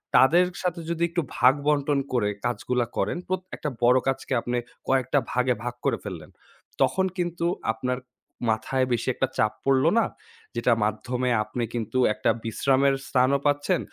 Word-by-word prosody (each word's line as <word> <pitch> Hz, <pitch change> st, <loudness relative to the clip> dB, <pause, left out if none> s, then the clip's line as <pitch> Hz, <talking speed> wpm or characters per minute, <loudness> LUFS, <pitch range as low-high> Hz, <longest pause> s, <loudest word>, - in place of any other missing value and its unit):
তাদের 170 Hz, +7 st, +6 dB, 0.2 s
সাথে 180 Hz, -1 st, -1 dB
যদি 170 Hz, 0 st, -1 dB
একটু 170 Hz, +1 st, 0 dB, 0.2 s
ভাগ-বন্টন 145 Hz, +2 st, +3 dB
করে 110 Hz, -5 st, +2 dB, 0.2 s
কাজগুলা 120 Hz, 0 st, 0 dB
করেন। -, -, 0 dB
প্রত 185 Hz, 0 st, -1 dB
একটা 150 Hz, -, -3 dB
বড় 125 Hz, +2 st, +6 dB
কাজকে 135 Hz, 0 st, -1 dB
আপনি 120 Hz, +1 st, -2 dB, 0.3 s
কয়েকটা 130 Hz, +1 st, +2 dB
ভাগে 125 Hz, 0 st, +2 dB
ভাগ 125 Hz, 0 st, -3 dB
করে -, -, +2 dB
ফেললেন। 85 Hz, -7 st, -7 dB, 0.5 s
তখন 190 Hz, -, +3 dB
কিন্তু 175 Hz, -1 st, -2 dB, 0.3 s
আপনার 125 Hz, +3 st, -2 dB, 0.5 s
মাথায় 130 Hz, +4 st, +1 dB
বেশি 120 Hz, -, -1 dB
একটা 135 Hz, -, +1 dB
চাপ 110 Hz, 0 st, +2 dB
পড়ল 135 Hz, 0 st, +3 dB
না। 225 Hz, -, +3 dB, 0.5 s
যেটা 125 Hz, -, +3 dB
মাধ্যমে 125 Hz, +4 st, -1 dB
আপনি 120 Hz, +3 st, -4 dB
কিন্তু 115 Hz, 0 st, -3 dB, 0.2 s
একটা -, -, 0 dB, 0.2 s
বিশ্রামের 135 Hz, +4 st, +2 dB
স্থানও 130 Hz, +2 st, +3 dB
পাচ্ছেন। 145 Hz, +5 st, +2 dB
130 Hz, 150 wpm, -25 LUFS, 120-145 Hz, 0.5 s, তাদের